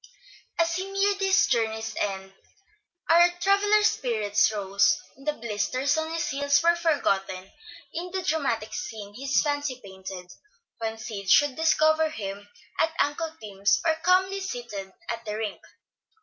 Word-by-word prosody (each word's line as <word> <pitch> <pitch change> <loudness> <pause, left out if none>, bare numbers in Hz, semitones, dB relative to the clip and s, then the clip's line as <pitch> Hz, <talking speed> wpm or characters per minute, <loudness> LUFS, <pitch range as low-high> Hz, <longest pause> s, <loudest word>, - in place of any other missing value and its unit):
As 335 0 +1
he 380 +1 -4
neared 395 0 +1
his 385 -3 +4
journey's 220 -5 -1
end 190 -1 -3 0.7
our 345 +1 +6
traveller's 410 +3 +3
spirits 220 - +2
rose, 200 -1 +2 0.2
and 275 +2 -17
the 300 - +2
blisters 245 +4 -1
on 315 0 -2
his 330 -1 -2
heels 285 +2 +2
were 340 0 +5
forgotten 195 - 0 0.4
in 350 +2 -4
the 375 +1 -3
dramatic 240 - -1
scene 205 -2 -6
his 275 +5 +1
fancy 290 -3 -2
painted, 190 -1 -9 0.5
when 225 -1 -3
Sid 215 -4 -6
should 290 +5 +5
discover 315 0 +3
him 205 -6 -6 0.3
at 320 0 +1
Uncle 315 +3 0
Tim's, 200 -2 +1
or 325 - +4
calmly 375 +2 +3
seated 240 - -6 0.2
at 230 0 -4
the 210 -1 -4
rink. 215 -2 -4
265 Hz, 145 wpm, -26 LUFS, 210-330 Hz, 0.7 s, our